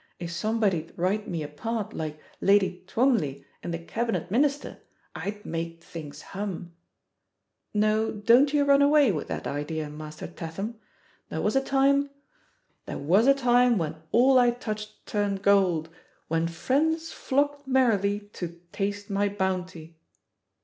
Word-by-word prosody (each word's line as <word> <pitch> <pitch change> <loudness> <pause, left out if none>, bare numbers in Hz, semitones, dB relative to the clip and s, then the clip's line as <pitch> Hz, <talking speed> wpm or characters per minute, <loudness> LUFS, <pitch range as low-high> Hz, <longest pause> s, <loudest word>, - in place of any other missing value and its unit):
if 170 -1 -6
somebody'd 190 -2 0
write 200 +5 0
me 165 -3 -3
a - - -4
part 220 +8 -4
like 155 -1 -5 0.2
Lady 195 -2 +3
Twombley 225 - +1 0.2
in - - -6
The 170 - -2
Cabinet 225 +2 -3
Minister 280 +5 0 0.4
I'd 200 +5 -5
make 165 0 -4
things 150 -3 -9
hum! 190 -3 -5 1.0
No, 215 +1 +2
don't 235 +7 +4
you 290 -1 +3
run 280 0 +5
away 285 -4 +5
with 155 - -3
that - - -4
idea. 150 +1 -3
Master 155 0 -8
Tatham. 195 +7 -6 0.5
There 160 - -3
was 210 - +1
a 270 - +4
time, 275 +1 +2 0.8
'There - - -4
was 185 - +3
a 275 - +7
time 245 -2 +4
when 160 -3 -2 0.2
all 255 +2 +6
I 245 -1 +5
touched 215 -3 -5
turned 200 -2 -1
gold. 185 -6 +3 0.4
When 165 +1 +1
friends 315 - 0
flocked 285 +1 -1
merrily 210 -6 +2
to 170 -1 -6
taste 205 +1 -3
mj 200 0 0
bounty!' 180 -4 -3
205 Hz, 140 wpm, -27 LUFS, 170-245 Hz, 1.0 s, a